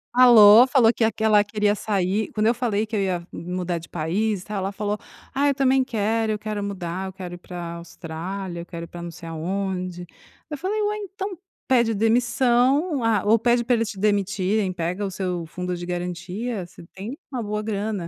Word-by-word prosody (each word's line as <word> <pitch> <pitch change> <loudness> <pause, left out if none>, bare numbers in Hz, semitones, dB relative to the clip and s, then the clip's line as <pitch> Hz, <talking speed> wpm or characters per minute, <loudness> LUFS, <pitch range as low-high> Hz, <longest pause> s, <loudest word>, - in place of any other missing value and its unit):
Falou. 235 -2 +9
Falou 245 -3 +5
que 235 - 0
a 225 - +3
que 220 +1 -5
ela 210 -1 +5
queria 210 0 +1
sair 200 0 -1
quando 215 -1 0
eu 230 - +5
falei 225 -4 0
que 220 - -5
eu 205 - +1
ia 180 -3 -2
mudar 180 0 -3
de 165 - -13
país 185 +5 -1
e - - -18
tal, 210 -1 -4
ela 195 +1 -2
falou: 205 +1 -2 0.4
"Ah, 280 +2 +2
eu 280 - +2
também 265 -1 +3
quero, 225 -2 0
eu 210 - -2
quero 210 -1 -4
mudar, 190 -2 -4
eu 190 - -8
quero 180 -2 -7
ir 175 - -7
pra 175 -1 -7
Austrália, 170 +2 -6
eu - - -9
quero 170 -1 -7
ir - - -15
pra 175 - -9
não 170 - -5
sei 165 +1 -10
aonde", 180 +2 -3
aí - - -12 0.4
eu 295 - -3
falei: 390 +8 -2
"Ué, 420 0 0
então 390 -1 -5 0.3
pede 235 -4 +3
demissão 245 - +2
ou 245 - -3
a 220 -4 +2
ou 220 +2 +5
pede 240 +1 +2
pra 245 +1 +1
eles 230 -2 0
te 200 - -7
demitirem, 200 -1 +1
pega 180 +3 -3
o 195 - -1
seu 180 -3 -3
fundo 180 +1 -4
de 175 - -7
garantia, 180 +5 -4
você 170 - -14
tem 215 +9 -7
uma 255 -3 -3
boa 210 0 -3
grana, 205 -3 -2
205 Hz, 220 wpm, -24 LUFS, 180-230 Hz, 0.4 s, Falou